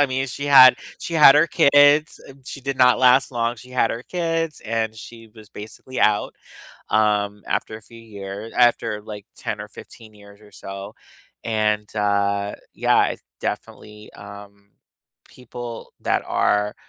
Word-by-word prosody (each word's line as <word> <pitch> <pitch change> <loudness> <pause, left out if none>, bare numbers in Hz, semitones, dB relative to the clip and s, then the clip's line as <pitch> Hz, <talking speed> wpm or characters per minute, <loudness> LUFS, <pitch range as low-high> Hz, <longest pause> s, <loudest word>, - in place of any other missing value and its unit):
I 145 - +4
mean, 130 +1 -2
she 140 +3 -6
had 130 -3 +8 0.2
she 170 - -7
had 150 -3 +8
her 155 +3 +4
kids, 145 +1 +4
eh, - - -12
she 140 - -8
did 135 -1 -4
not 125 0 +5
last 130 +1 +4
long; 120 -1 -2
she 125 +3 -15
had 125 -2 +1
her 120 - -5
kids, 165 -2 -3
and 110 0 -2
she 115 0 -12
was 110 -1 -15
basically 110 +5 -9
out, 105 -1 +1 0.6
um, 105 -1 0
after 110 - -3
a - - -17
few 115 +2 -15
year 105 0 -9
after, 115 -3 +1
like, 105 -1 -10
10 - - -5
or - - -9
15 110 -2 -14
years 100 0 -18
or 105 - -19
so, 100 +2 -9 0.5
and, 105 -2 -1
uh, 100 0 -1 0.2
yeah, - - +2
it's - - -6 0.2
definitely, 105 0 -7
um, 100 0 -14 0.7
people 120 -1 -9
that - - 0
are, 105 0 0
110 Hz, 160 wpm, -21 LUFS, 105-130 Hz, 0.7 s, had